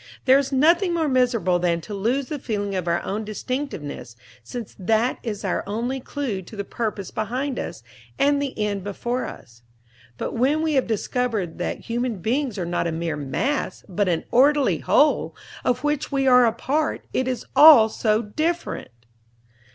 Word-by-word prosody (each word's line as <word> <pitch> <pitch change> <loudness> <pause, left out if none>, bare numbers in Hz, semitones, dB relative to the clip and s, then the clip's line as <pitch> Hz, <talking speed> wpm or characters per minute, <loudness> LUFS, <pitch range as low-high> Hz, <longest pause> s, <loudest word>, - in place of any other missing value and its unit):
There 265 +1 +6
is 275 0 -2
nothing 340 +6 +3
more 325 -2 +1
miserable 245 -9 +2
than 170 -1 +1
to 210 - -8
lose 235 +8 0
the 300 - -4
feeling 205 -5 -3
of 185 -2 -2
our 170 0 0
own 210 +3 -3
distinctiveness, 210 - -5 0.3
since 225 - -7
that 220 +6 +1
is 210 -3 -5
our 185 - -1
only 235 +6 -2
clue 255 -7 -4
to 190 - -12
the 200 - -3
Purpose 210 -2 -4
behind 250 +5 -2
us - - -6 0.3
and 285 0 +3
the 280 -2 -4
End 205 -3 -1
before 240 +5 -3
us. 120 -2 -12 0.6
But - - -4
when 280 +7 +1
we 315 -1 +1
have 265 -2 +2
discovered 220 -5 -2
that 175 - -3
human 240 0 -2
beings 240 - -1
are 180 - -2
not 175 0 -1
a - - -1
mere 160 0 -2
"mass," 150 - -2
but 195 0 0
an 165 -2 0
orderly 280 +2 +4
Whole, 300 +2 +2 0.3
of 250 - 0
which 295 0 -1
we 275 -1 +1
are 250 -1 +7
a - - +3
part, 290 +7 -1
it 260 - 0
is 255 -2 -3
all 295 -8 +9
so 215 0 0
different! 315 +11 -2
235 Hz, 175 wpm, -23 LUFS, 200-275 Hz, 0.6 s, all